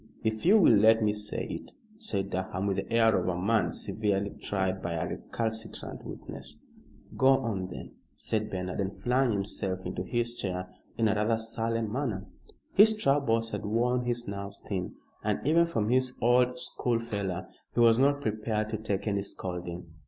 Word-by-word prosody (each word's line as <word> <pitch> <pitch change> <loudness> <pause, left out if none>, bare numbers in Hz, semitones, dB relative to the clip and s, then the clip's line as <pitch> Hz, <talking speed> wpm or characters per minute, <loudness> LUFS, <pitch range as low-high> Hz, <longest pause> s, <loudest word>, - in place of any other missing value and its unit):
"If 110 +5 -1
you 210 +4 +8
will 185 - +7
let 110 +1 +6
me 105 -1 +3
say 105 +2 -5
it," - - -7 0.2
said 100 - -3
Durham, 95 +1 -2
with 100 -1 0
the - - -4
air 115 -2 +5
of - - 0
a 90 -1 0
man 100 -2 +2
severely 100 -2 -1
tried 95 -1 -2
by 85 - -3
a 80 - -1
recalcitrant 110 -1 -4
witness. - - -8 0.6
"Go 130 - +3
on, 115 -9 +2
then," 90 - -8 0.2
said 110 -1 -2
Bernard, 90 0 -4
and 95 0 -4
flung 125 0 +2
himself 95 -2 -3
into 90 0 -3
his 120 +4 -1
chair 90 -6 -4 0.2
in 115 - +3
a 105 - +3
rather 110 +2 +2
sullen 115 -1 -2
manner. 115 -6 -2 0.5
His 220 +2 +7
troubles 120 - +2
had - - -3
worn 120 +4 +1
his 120 0 -1
nerves 100 0 -6
thin, 95 -3 -3 0.3
and - - 0
even 165 +3 +4
from 110 -10 -1
his 130 +1 +2
old 125 +1 +3
schoolfellow 110 -7 -2 0.3
he - - +1
was 115 0 +6
not 140 +1 +3
prepared 110 -2 -1
to 110 - -2
take 105 -2 -2
any 100 -2 0
scolding. 90 -2 -5
110 Hz, 175 wpm, -29 LUFS, 100-120 Hz, 0.6 s, you